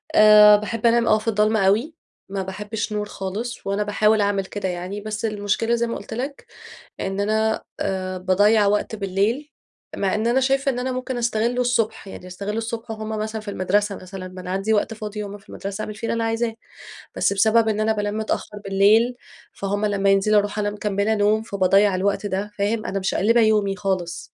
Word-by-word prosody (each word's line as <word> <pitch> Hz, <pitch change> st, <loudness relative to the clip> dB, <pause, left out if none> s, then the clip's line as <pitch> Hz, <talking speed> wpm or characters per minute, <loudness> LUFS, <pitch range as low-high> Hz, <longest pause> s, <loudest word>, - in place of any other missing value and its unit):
آآ، 210 Hz, 0 st, +8 dB
باحب 215 Hz, +2 st, -4 dB
أنام 235 Hz, 0 st, +4 dB
آه 215 Hz, -, +5 dB
في 215 Hz, -, -12 dB
الضلمة 215 Hz, -2 st, +2 dB
أوي، 235 Hz, +11 st, +1 dB, 0.3 s
ما 195 Hz, -1 st, -3 dB
باحبش 210 Hz, +3 st, -4 dB
نور 210 Hz, 0 st, -2 dB
خالص، 205 Hz, +4 st, -5 dB
وأنا 200 Hz, +1 st, 0 dB
باحاول 210 Hz, +1 st, +2 dB
أعمل 200 Hz, -1 st, 0 dB
كده 190 Hz, 0 st, -4 dB
يعني، 180 Hz, +3 st, -5 dB
بس 215 Hz, +1 st, -4 dB
المشكلة 215 Hz, +2 st, 0 dB
زي 235 Hz, 0 st, 0 dB
ما 230 Hz, -, -3 dB
قُلت -, -, -9 dB
لك 270 Hz, +5 st, -5 dB, 0.6 s
إن 195 Hz, +1 st, -2 dB
أنا 220 Hz, +2 st, +1 dB, 0.2 s
آآ، 185 Hz, -1 st, -2 dB
باضيّع 205 Hz, +3 st, +3 dB
وقت 210 Hz, +2 st, 0 dB
بالليل، 210 Hz, +9 st, -1 dB, 0.4 s
مع 195 Hz, -1 st, 0 dB
إن 215 Hz, +2 st, -1 dB
أنا 240 Hz, +3 st, +3 dB
شايفة 270 Hz, +1 st, +1 dB
إن 245 Hz, -, -5 dB
أنا 255 Hz, +1 st, -2 dB
ممكن 255 Hz, 0 st, -4 dB
أستغله 240 Hz, +1 st, 0 dB
الصبح، 235 Hz, -4 st, 0 dB
يعني 185 Hz, -, -10 dB
أستغل 200 Hz, +4 st, -5 dB
الصبح 225 Hz, 0 st, -4 dB
وهُم 215 Hz, 0 st, -6 dB
مثلًا 220 Hz, 0 st, -3 dB
في 210 Hz, -1 st, -7 dB
المدرسة، 200 Hz, +2 st, 0 dB
مثلًا 185 Hz, 0 st, -8 dB
ما 185 Hz, 0 st, -10 dB
أنا 180 Hz, 0 st, -7 dB
عندي 195 Hz, +3 st, 0 dB
وقت 215 Hz, +2 st, 0 dB
فاضي 210 Hz, -1 st, -6 dB
وهُم 205 Hz, +1 st, -8 dB
في 200 Hz, -, -25 dB
المدرسة 200 Hz, +3 st, -5 dB
أعمل 215 Hz, -, -6 dB
فيه 215 Hz, +2 st, -5 dB
اللي -, -, 0 dB
أنا 230 Hz, 0 st, -1 dB
عايزاه. 225 Hz, 0 st, -1 dB, 0.6 s
بس -, -, +2 dB
بسبب 220 Hz, +3 st, +3 dB
إن 215 Hz, 0 st, 0 dB
أنا 220 Hz, +1 st, +2 dB
بانام 205 Hz, 0 st, -2 dB
متأخر 215 Hz, -1 st, -3 dB
بالليل، 210 Hz, +5 st, +4 dB, 0.4 s
فهُم 205 Hz, +2 st, -2 dB
لما 200 Hz, -1 st, +1 dB
ينزلوا 200 Hz, +2 st, +4 dB
أروح 205 Hz, +1 st, -4 dB
أنا 205 Hz, 0 st, 0 dB
مكملة 205 Hz, +1 st, -1 dB
نوم، 215 Hz, +1 st, +2 dB
فباضيّع 200 Hz, -1 st, +3 dB
الوقت 200 Hz, +2 st, 0 dB
ده، 200 Hz, +1 st, -3 dB
فاهم؟ 215 Hz, +2 st, 0 dB
أنا 195 Hz, -, -2 dB
مشقلبة 215 Hz, +5 st, +2 dB
يومي 210 Hz, -3 st, +2 dB
خالص. 185 Hz, -4 st, -2 dB
210 Hz, 195 wpm, -22 LUFS, 195-225 Hz, 0.6 s, آآ